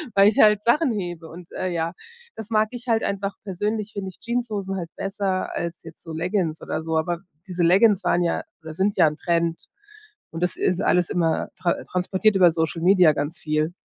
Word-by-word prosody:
weil 200 Hz, 0 st, +7 dB
ich 210 Hz, -, +2 dB
halt 210 Hz, -1 st, +6 dB
Sachen 270 Hz, +4 st, +3 dB
hebe 175 Hz, -6 st, -4 dB
und, 175 Hz, +1 st, -12 dB
äh, 185 Hz, -, -2 dB
ja, 165 Hz, 0 st, -2 dB, 0.4 s
das 220 Hz, -1 st, -8 dB
mag 215 Hz, -1 st, +2 dB
ich 245 Hz, 0 st, -8 dB
halt 225 Hz, -1 st, +3 dB
einfach. 200 Hz, 0 st, -2 dB
Persönlich 210 Hz, +3 st, -3 dB
finde 195 Hz, -2 st, -4 dB
ich 185 Hz, -, -14 dB
Jeanshosen 220 Hz, -5 st, -3 dB
halt 175 Hz, -3 st, -5 dB
besser 195 Hz, -1 st, -2 dB
als 170 Hz, 0 st, -4 dB
jetzt 160 Hz, -1 st, -13 dB
so 165 Hz, -, -9 dB
Leggins 165 Hz, -1 st, -1 dB
oder -, -, -3 dB
so. 160 Hz, 0 st, -1 dB
Aber, 170 Hz, +2 st, -1 dB, 0.3 s
diese 180 Hz, -2 st, -1 dB
Leggins 195 Hz, +3 st, +5 dB
waren 175 Hz, -1 st, +2 dB
ja, 170 Hz, -, 0 dB, 0.2 s
oder 160 Hz, 0 st, -8 dB
sind 195 Hz, +5 st, 0 dB
ja -, -, +6 dB
‘n 150 Hz, -, -2 dB
Trend 170 Hz, -1 st, -1 dB, 0.6 s
und 165 Hz, +2 st, -4 dB
das 180 Hz, -, -1 dB
ist 180 Hz, +1 st, 0 dB
alles 180 Hz, -4 st, +2 dB
immer 165 Hz, -2 st, 0 dB
tra 175 Hz, -2 st, +2 dB
transportiert 190 Hz, +3 st, +1 dB
über 180 Hz, -3 st, +6 dB
Social 160 Hz, 0 st, -1 dB
Media 180 Hz, -3 st, +5 dB
ganz 145 Hz, +3 st, -3 dB
viel. 155 Hz, +2 st, -1 dB
180 Hz, 205 wpm, -23 LUFS, 165-205 Hz, 0.6 s, weil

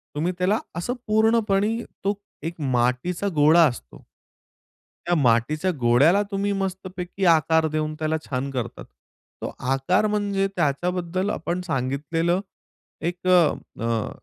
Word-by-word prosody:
तुम्ही 170 Hz, +5 st, 0 dB
त्याला 195 Hz, +5 st, +2 dB, 0.2 s
असं 175 Hz, +9 st, -2 dB
पूर्णपणे 220 Hz, -1 st, +2 dB, 0.3 s
तो 200 Hz, +1 st, +2 dB, 0.3 s
एक 165 Hz, -1 st, -5 dB
मातीचा 130 Hz, +9 st, 0 dB
गोळा 155 Hz, +3 st, +6 dB
असतो 120 Hz, -, -8 dB, 1.0 s
त्या 175 Hz, -, +2 dB
मातीच्या 150 Hz, +6 st, +2 dB
गोळ्याला 135 Hz, +11 st, +4 dB
तुम्ही 200 Hz, +1 st, 0 dB
मस्तपैकी 190 Hz, 0 st, -4 dB
आकार 160 Hz, -1 st, +4 dB
देऊन 155 Hz, 0 st, -1 dB
त्याला 155 Hz, 0 st, 0 dB
छान 135 Hz, +1 st, -2 dB
करतात. 125 Hz, -4 st, -5 dB, 0.6 s
तो -, -, -4 dB, 0.2 s
आकार 180 Hz, +11 st, +2 dB
म्हणजे 200 Hz, -2 st, 0 dB
त्याच्याबद्दल 180 Hz, +4 st, -1 dB
आपण 175 Hz, -2 st, -2 dB
सांगितलेलं 160 Hz, +3 st, -1 dB, 0.7 s
एक 180 Hz, +1 st, -7 dB
अ, 185 Hz, -, +5 dB, 0.5 s
अ, 115 Hz, -2 st, -1 dB
170 Hz, 120 wpm, -24 LUFS, 145-190 Hz, 1.0 s, गोळा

